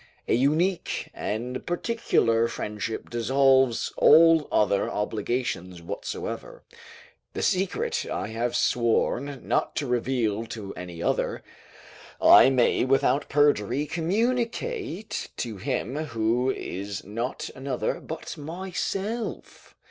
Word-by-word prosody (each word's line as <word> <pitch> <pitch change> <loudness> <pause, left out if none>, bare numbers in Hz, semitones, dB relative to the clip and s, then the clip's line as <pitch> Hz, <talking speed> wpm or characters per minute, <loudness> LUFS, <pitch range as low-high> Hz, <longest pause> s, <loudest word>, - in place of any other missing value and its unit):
A - - +2
unique 155 +9 +1
and 120 +4 -4
particular 175 - +1
friendship 105 -1 -4
dissolves 130 +1 +3
all 165 -1 +6
other 100 -2 +2
obligations 105 -4 -2
whatsoever: 85 - -6 0.7
the - - -3
secret 190 0 0
I - - -3
have 115 +2 -2
sworn 125 +4 0
not - - 0
to 150 - -1
reveal 120 -3 0
to 100 -4 -7
any 85 -2 -7
other, - - -1 0.8
I - - +8
may 130 -3 +3
without 135 +2 +2
perjury 145 -2 +2
communicate 235 - -2
to 115 -4 -4
him 130 +3 -2
who 120 -3 0
is 100 -4 -4
not 115 +5 -4
another, 130 -1 -2
but 160 0 -7
myself. 190 +7 -4
130 Hz, 105 wpm, -26 LUFS, 115-160 Hz, 0.8 s, I